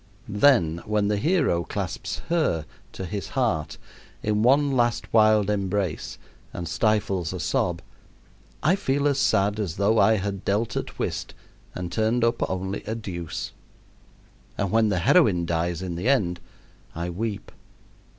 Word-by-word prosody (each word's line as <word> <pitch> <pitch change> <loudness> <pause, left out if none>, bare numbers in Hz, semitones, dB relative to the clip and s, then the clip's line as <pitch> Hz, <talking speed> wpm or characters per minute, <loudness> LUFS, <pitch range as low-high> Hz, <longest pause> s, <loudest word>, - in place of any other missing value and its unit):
Then, 100 - +3
when 105 -1 +1
the 105 - +1
hero 150 - +2
clasps - - -4
"her" 155 - +1 0.3
to 95 - -5
his 100 +1 -4
heart 80 - 0 0.5
in 105 0 +1
one 140 +4 +4
last 120 -2 0
wild 110 -2 +5
embrace 100 -3 -2 0.4
and 85 -1 -5
stifles 100 -6 0
a - - -5
sob, 85 -1 -1 0.8
I 170 +6 +4
feel 145 -7 0
as 140 -1 +1
sad 100 -4 +2
as 95 -6 -2
though 105 +3 +2
I 110 +3 +5
had 100 -1 -3
dealt 105 +3 0
at - - -4
whist - - -3 0.4
and 90 -1 -5
turned 110 +5 +1
up 115 0 +1
only 95 +1 -3
a 110 +1 -3
deuce; 85 -7 -5 1.1
and 100 -2 -1
when 110 -1 +3
the 95 - +1
heroine 100 - +4
dies 85 +1 -1
in 90 -2 -3
the 90 +9 -1
end 90 -11 +2 0.6
I 85 +2 -3
weep. 105 +3 -4
105 Hz, 150 wpm, -25 LUFS, 90-115 Hz, 1.1 s, wild